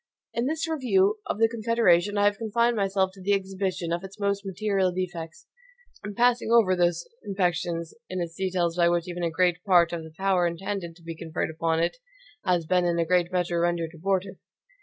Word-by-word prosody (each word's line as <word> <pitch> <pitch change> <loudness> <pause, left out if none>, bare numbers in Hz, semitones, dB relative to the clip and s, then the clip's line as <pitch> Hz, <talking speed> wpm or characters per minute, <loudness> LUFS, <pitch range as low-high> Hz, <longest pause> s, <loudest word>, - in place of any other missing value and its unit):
In 235 +2 0
this 320 +2 -1
review 215 -9 +2
of - - -2
the 225 +1 +4
Confederation, 220 -4 +2
I 205 - +3
have 205 0 +2
confined 235 +2 +1
myself 195 -2 +1
to 190 - -14
the 200 +2 +1
exhibition 190 -3 -3
of 175 +2 -2
its 195 +2 -10
most 200 0 0
material 195 -1 0
defects; 175 -3 -5 0.7
passing 245 -1 +3
over 220 -6 +5
those 175 -1 +1 0.2
imperfections 175 -4 -1 0.2
in 185 - -3
its 170 -1 -3
details 180 -2 -1
by 170 -1 +4
which 175 0 0
even 175 0 -5
a 170 - +1
great 180 +1 +1
part 175 -4 +4
of 170 - -3
the 160 0 -12
power 190 -2 +2
intended 175 0 -4
to 170 - -20
be 165 0 -6
conferred 160 -1 -3
upon 160 0 0
it 170 - -1 0.5
has 175 -3 +1
been 180 +2 +2
in 170 -1 +1
a 170 - +1
great 180 +1 +2
measure 175 -2 0
rendered 170 -1 0
abortive. 190 +3 -2
185 Hz, 195 wpm, -26 LUFS, 170-200 Hz, 0.7 s, over